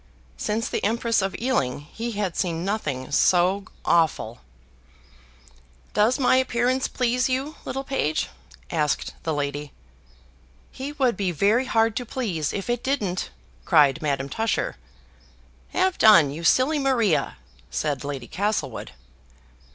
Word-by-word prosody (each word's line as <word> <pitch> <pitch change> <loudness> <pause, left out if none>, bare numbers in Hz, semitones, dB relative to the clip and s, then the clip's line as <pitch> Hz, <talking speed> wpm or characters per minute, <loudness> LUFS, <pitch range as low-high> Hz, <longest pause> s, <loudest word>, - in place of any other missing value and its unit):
Since 215 - -2
the - - -3
Empress 230 +1 +1
of 195 0 -2
Ealing, 145 - 0
he 225 +10 -6
had 200 -4 -2
seen 170 -2 -1
nothing 145 -11 -3
so 185 +6 +3 0.2
awful. 155 -9 +1 1.5
"Does 220 +4 +3
my 255 -1 +4
appearance 255 0 +1
please 250 +1 0
you, 270 +5 -2
little 270 +1 -3
page?" 160 - -1 0.4
asked 150 -1 0
the 160 - -2
lady. 145 -1 -3 1.0
"He 270 +2 -6
would 260 -6 +1
be 190 -2 -1
very 205 - +2
hard 225 -3 +2
to 245 - -3
please 185 - -2
if 195 - -4
it 240 0 -1
didn't," 210 -10 -1 0.3
cried 145 - +4
Madame 140 -3 -1
Tusher. 225 +10 -1 0.9
"Have 375 0 0
done, 170 -10 +7
you 160 +4 -7
silly 260 - +3
Maria," 240 - +1 0.3
said 145 -4 -2
Lady 140 -4 -5
Castlewood. 190 - -2
205 Hz, 130 wpm, -24 LUFS, 155-245 Hz, 1.5 s, done